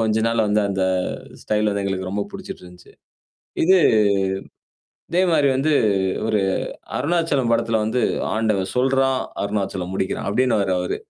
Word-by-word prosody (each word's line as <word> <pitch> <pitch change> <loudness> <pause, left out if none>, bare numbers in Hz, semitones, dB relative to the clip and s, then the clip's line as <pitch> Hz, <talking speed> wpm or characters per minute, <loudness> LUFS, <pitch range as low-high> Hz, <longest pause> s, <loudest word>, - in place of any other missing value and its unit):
கொஞ்ச 110 -1 +1
நாள் 115 -1 +1
வந்து 105 +1 +2
அந்த 95 -1 -1 0.6
ஸ்டைல் 105 0 0
வந்து 100 0 -2
எங்களுக்கு 95 -1 -3
ரொம்ப 100 +1 -2
புடிச்சுட்டு - - -8
இருந்துச்சு. 90 0 -15 0.7
இது 190 +3 +5 1.3
இதே 175 - +2
மாரி 145 -3 +3
வந்து 155 +4 +1 0.5
ஒரு 110 -1 +1 0.6
அருணாச்சலம் 145 -5 0
படத்தில 115 -1 +1
வந்து, 115 +4 0 0.3
"ஆண்டவன் 105 -4 0
சொல்றான், 135 +1 +2 0.2
அருணாச்சலம் 95 -3 -3
முடிக்கிறான்." 95 0 -2
அப்டினுவாரு 110 -5 +1
அவரு. 90 - -2
110 Hz, 130 wpm, -21 LUFS, 100-130 Hz, 1.3 s, இது